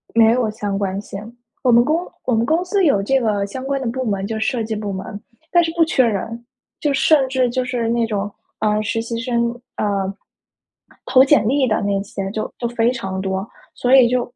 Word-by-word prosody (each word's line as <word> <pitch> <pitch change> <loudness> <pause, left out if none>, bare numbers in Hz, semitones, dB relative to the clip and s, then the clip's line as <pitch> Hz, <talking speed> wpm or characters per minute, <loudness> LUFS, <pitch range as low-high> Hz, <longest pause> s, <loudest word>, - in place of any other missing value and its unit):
没 225 -1 +6
有 240 -2 +1
相 205 -2 -3
关 195 -1 -2
性， 200 -1 -8 0.4
我 250 - +4
们 235 0 +6
公 325 +6 0 0.2
我 250 - +1
们 225 +1 +2
公 320 +6 +1
司 390 +1 +1
有 240 -10 +3
这 270 +6 +2
个 210 -4 0
相 255 +6 -7
关 275 0 -1
的 260 - -2
部 260 +3 -2
门 200 -3 -1
就 220 +1 -3
设 225 +2 0
计 220 0 -3
部 210 -1 -4
门， 195 +1 -6 0.3
但 345 -1 +5
是 330 - -1
不 335 - +5
缺 265 -5 +3
人。 230 +2 -3 0.4
就 295 -2 +1
甚 275 0 +4
至 260 -1 +1
就 255 +1 -1
是 245 -3 -1
那 235 0 +1
种， 205 -1 -2 0.3
啊， 210 0 +1
实 225 +2 -1
习 230 0 -4
生， 235 -1 0 0.2
啊， - - -1 1.2
投 255 0 +5
简 285 -4 +4
历 265 +3 +2
的 215 -1 +1
那 200 -1 0
些 195 -1 -5
就 215 +1 -3
就 240 - -4
非 235 0 +2
常 195 -7 -3
多。 190 0 -2 0.3
所 250 +1 +1
以 250 -2 +7
就 250 +1 +1
230 Hz, 235 characters per minute, -20 LUFS, 210-260 Hz, 1.2 s, 以